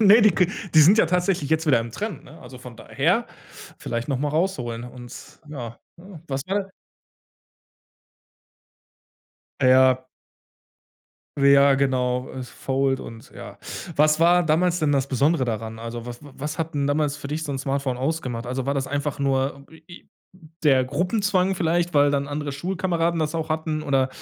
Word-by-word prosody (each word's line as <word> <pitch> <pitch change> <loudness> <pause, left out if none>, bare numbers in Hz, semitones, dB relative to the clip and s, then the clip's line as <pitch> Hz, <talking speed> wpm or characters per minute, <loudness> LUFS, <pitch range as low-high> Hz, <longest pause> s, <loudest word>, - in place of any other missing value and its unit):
Ne, 215 +2 +7
die 215 - +6
k 180 0 +2 0.3
die 155 - +8
sind 180 +8 +7
ja - - +5
tatsächlich 180 -3 0
jetzt 160 +1 +1
wieder 135 -6 +4
im 115 0 -6
Trend, 200 - -5
ne? 160 +4 -15
Also 130 - -11
von 125 -2 -11
daher, - - 0 0.5
vielleicht 115 +2 -4
noch 135 -3 0
mal 145 +2 -1
rausholen, 135 -8 -2
und 125 0 -11 0.4
ja, 120 -6 -7 0.2
ne? 175 -2 -13
Was 135 0 -2
war 195 0 -2 2.9
Ja. 130 0 +4 1.3
Ja 140 0 +5
genau, 125 -2 0
es 130 -2 -8
fold 135 0 -1
und 115 0 -11
ja. - - -10 0.4
Was 155 +2 +3
war 175 +1 +5
damals 170 +3 +1
denn 150 -2 +2
das 135 -1 +1
Besondere 140 +2 +1
daran? 110 -1 -4
Also, 115 0 -6
wa 120 - -6
was 150 +2 -7
hat 165 -1 -3
denn 140 -1 0
damals 145 0 0
für 150 - -8
dich 150 +3 -3
so 150 - -4
'n 135 - -3
Smartphone 135 -1 -2
ausgemacht? 130 -4 -3
Also, 130 +1 -3
war 140 - 0
das 135 -1 -2
einfach 145 0 -3
nur 140 0 -1
d 160 - -14
i 160 - -23 0.2
i - - -35 0.6
der 135 -3 +4
Gruppenzwang 185 - 0
vielleicht, 175 0 0
weil 145 0 +5
dann 140 0 0
andere 145 0 -4
Schulkameraden 170 +1 -1
das 155 +1 -1
auch 160 -1 -2
hatten, 155 -1 -2
oder, 135 -3 +1
145 Hz, 170 wpm, -23 LUFS, 130-165 Hz, 2.9 s, die